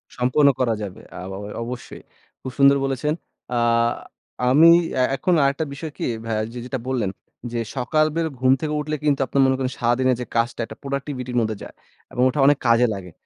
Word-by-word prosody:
সম্পন্ন 130 +4 +3
করা 120 -3 +2
যাবে। 95 -3 -7 0.2
আবা 95 +1 -6 0.3
অবশ্যই। 125 +1 -7 0.4
খুব 130 - -6
সুন্দর 140 0 +6
বলেছেন, 135 +3 -1 0.4
আ - - +1 0.9
আমি 155 +6 +7 0.3
এ্যাঁ 130 0 +2
এখন 180 - +1
আরেকটা 140 +3 +1
বিষয় 155 +2 -6
কি - - -3 0.2
ভাইয়া 110 -1 -1
যে 125 - -6
যেটা 130 0 -4
বললেন, 120 -7 -1 0.4
যে 120 - -2 0.2
সকালবেলা 155 +5 +1
ঘুম 130 0 +4
থেকে 150 -1 -2
উঠলে 155 +1 -2
কিন্তু 145 -2 +2
আপনার 140 - +2
মনে 130 - +3
করেন 130 -1 -2
সারাদিনের 125 +2 +2
যে - - -3
কাজটা 115 +1 0
একটা 110 - -11
প্রোডাক্টিভিটির 135 -3 -4
মধ্যে 110 -1 -1
যায়। - - -10 0.4
এবং 125 - -2
ওঠা 145 - -3
অনেক 145 0 +5
কাজে 115 +1 +5
লাগে। 95 -3 -8
130 Hz, 180 wpm, -22 LUFS, 120-140 Hz, 0.9 s, আমি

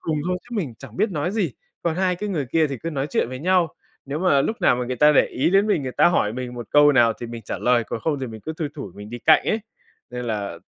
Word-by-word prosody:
cùng 160 -2 -2
thôi 180 - 0
chứ 240 -1 -7
mình 150 - -3
chẳng 125 -4 -12
biết 215 - +1
nói 155 0 -1
gì, 195 - -1 0.3
còn 170 -2 0
hai 185 -1 +1
cái 210 +3 -4
người 155 -8 -2
kia 160 +5 +2
thì 135 -4 -5
cứ 165 - -4
nói 140 -2 -2
chuyện 115 - 0
với 130 - -6
nhau. 175 +1 +2 0.3
Nếu 140 +2 -3
mà 165 -6 +3
lúc 225 - -1
nào - - +4
mà 125 - -2
người 125 +1 -3
ta 150 +2 +6
để - - +5
ý 130 - 0
đến 195 +2 +4
mình, 205 -8 +1
người 130 -1 -4
ta - - +4
hỏi 105 -11 +1
mình 125 0 -5
một 120 -2 -7
câu 145 0 +6
nào 115 -4 +5
thì 120 - -4
mình 115 -1 -8
trả - - -5
lời, 120 -2 +2
còn 115 - -5
không 150 -1 -1
thì 130 - -3
mình 110 -2 -9
cứ 160 - -5
thui 160 -3 -2
thủi 135 - -7
mình 105 +1 -10
đi 120 - -6
cạnh 155 +6 +5
ấy. 220 - +1 0.5
Nên 125 0 -5
là 100 -6 -3
140 Hz, 300 wpm, -23 LUFS, 120-170 Hz, 0.5 s, ta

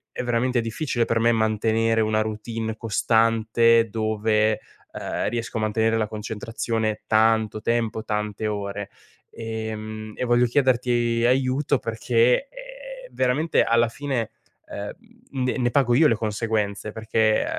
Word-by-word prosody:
è - - -3
veramente 120 +1 +1
difficile 120 +1 -1
per 115 0 0
me 115 +1 +4
mantenere 110 +1 +1
una 110 0 +1
routine 110 +1 -4
costante, 115 +1 +3
dove, 110 0 +1 0.3
uhm, - - -3
riesco 115 -1 -4
a - - -1
mantenere 110 +1 +1
la 110 -1 0
concentrazione 110 +1 -3
tanto 110 -1 +2
tempo, 115 -1 -1
tante 105 0 -2
ore. 100 -1 -4 0.4
E 110 -1 -5
mhmm, 110 0 -7
e - - -3
voglio 120 0 +3
chiederti 120 -2 +1
aiuto 130 +1 +1
perché, 115 - +1 0.6
uhm, - - -22
veramente 140 +6 +2
alla 115 0 +3
fine, 125 -3 -3 0.4
uhm, 100 0 -6 0.5
ne 130 - -1
ne 120 -1 +1
pago 125 -3 +3
io 155 +2 +6
le 115 - +2
conseguenze 105 -1 -2
perché, 110 0 +1
115 Hz, 135 wpm, -24 LUFS, 110-120 Hz, 0.6 s, io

